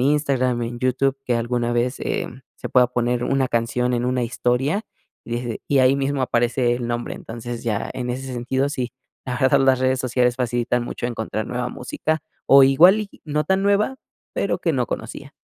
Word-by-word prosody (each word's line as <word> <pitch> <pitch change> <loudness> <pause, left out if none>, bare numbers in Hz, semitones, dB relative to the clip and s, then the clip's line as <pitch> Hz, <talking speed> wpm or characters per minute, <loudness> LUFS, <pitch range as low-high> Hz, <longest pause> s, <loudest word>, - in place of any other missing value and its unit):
Instagram, 135 -4 +1
en 120 +1 -4
YouTube, 130 +2 +1
que 120 - 0
alguna 120 0 -1
vez, 120 +3 0
eh, - - -2 0.3
se - - -6
pueda 125 -1 +5
poner 120 0 0
una 135 -1 +1
canción 125 +1 0
en 120 0 -1
una 125 0 0
historia, 130 - 0 0.4
y - - -12
des 120 -2 -4
y 140 - +3
ahí 130 +1 +5
mismo 140 0 -1
aparece 120 0 +1
el 120 -1 -3
nombre. 120 0 -3
Entonces, 120 +1 -7
ya, 110 -3 -1
en 125 -1 -3
ese 130 +1 -5
sentido, 130 +3 -1
sí. 125 -3 -3 0.3
La 125 -1 -3
verdad, 135 +1 +4
las 135 -1 +4
redes 130 0 +1
sociales 125 -1 +1
facilitan 120 -1 0
mucho 120 - -4
encontrar 110 -2 -3
nueva 125 0 -2
música, 155 +5 -3 0.2
o 135 0 +8
igual 175 +10 +6
y 200 - -12
no 150 0 -1
tan 190 0 +1
nueva, 205 +6 +2 0.4
pero - - -1
que - - 0
no - - 0
conocía. - - -6
125 Hz, 190 wpm, -22 LUFS, 120-135 Hz, 0.4 s, o